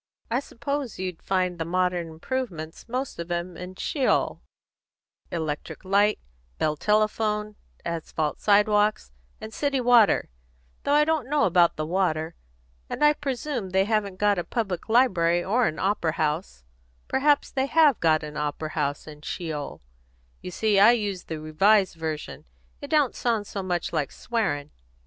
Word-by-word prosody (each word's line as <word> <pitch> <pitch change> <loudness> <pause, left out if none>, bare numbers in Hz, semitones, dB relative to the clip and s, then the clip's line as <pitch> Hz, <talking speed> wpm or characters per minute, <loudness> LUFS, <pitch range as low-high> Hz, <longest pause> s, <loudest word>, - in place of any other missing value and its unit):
I 240 - +2
suppose 275 -1 -4
you'd 185 -3 -5
find 185 -2 -1
the - - 0
modern 180 0 0
improvements, 165 -1 -5
most 255 -2 -3
of 170 0 -5
'em, 175 0 -3
in 180 +2 -8
Sheol: 270 +6 0 0.9
electric 155 +1 -4
light, 205 +2 +3 0.4
Bell 155 - 0
telephone, 210 +2 0 0.3
asphalt 160 -2 -3
sidewalks, 210 - +3 0.3
and 220 0 -8
city 280 -2 0
water 240 - +4 0.5
though 285 - +1
I 300 0 +5
don't 310 -5 0
know 295 0 +2
about 175 -1 +4
the 155 - -3
water; 165 -2 0 0.6
and - - -2
I 295 - +6
presume 270 -6 -3
they 190 +1 +2
haven't 210 -3 0
got 205 -1 +2
a - - -2
public 195 -4 -3
library 175 -8 +3
or 235 +4 +2
an 155 - -3
opera 190 -5 0
house 155 - -2 0.4
perhaps 290 +2 +2
they 265 0 0
have 305 -4 +4
got 160 -1 +3
an 150 0 -7
opera 150 +1 -3
house 145 -2 -2
in 150 -1 -11
Sheol: 155 - -5 0.6
you - - -6
see 205 +2 +2
I 215 +4 +8
use 205 -6 -2
the 160 -1 -5
Revised 190 +6 +3
Version, 160 -2 -5 0.4
it 285 - -7
don't 295 -5 +3
sound 230 -4 -1
so 200 -1 -5
much 180 -2 -2
like 145 -3 -1
swearing. 195 - -2
195 Hz, 155 wpm, -25 LUFS, 165-235 Hz, 0.9 s, I